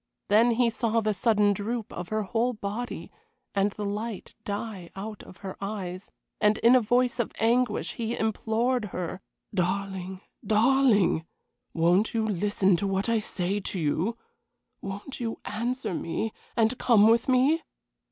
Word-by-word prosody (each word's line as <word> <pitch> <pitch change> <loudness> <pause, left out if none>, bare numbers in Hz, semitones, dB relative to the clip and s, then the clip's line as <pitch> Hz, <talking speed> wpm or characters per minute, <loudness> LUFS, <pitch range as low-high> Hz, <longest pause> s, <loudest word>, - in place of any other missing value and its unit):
Then 220 +4 +5
he 235 0 +2
saw 230 0 +1
the 215 -1 +1
sudden 205 0 +3
droop 215 +3 -4
of 175 0 -6
her 215 0 0
whole 230 +6 0
body 215 +3 -5 0.4
and 200 0 +2
the 205 +1 -5
light 210 +1 -4
die 200 -3 -5
out 210 +2 -6
of 185 - -14
her 190 - -5
eyes, 195 -2 -4 0.3
and 210 +1 +3
in 235 +2 +5
a 255 - +6
voice 245 +2 +2
of 240 - 0
anguish 235 0 +1
he 230 0 -3
implored 220 +2 0
her: 185 -1 -5 0.3
"Darling, 190 0 -2 0.2
darling! 215 -7 +3 0.5
Won't 175 +7 +3
you 220 -1 +1
listen 195 -1 +2
to 200 - -1
what 195 +3 0
I 230 -1 +3
say 195 -1 -2
to 190 -1 -4
you? 165 +9 0 0.6
Won't 200 +8 -6
you 230 -2 -3
answer 235 0 -2
me, 210 +7 -2 0.2
and 230 +2 +2
come 220 -4 +5
with 230 +3 +3
me?" 265 +6 +4
215 Hz, 150 wpm, -27 LUFS, 195-230 Hz, 0.6 s, a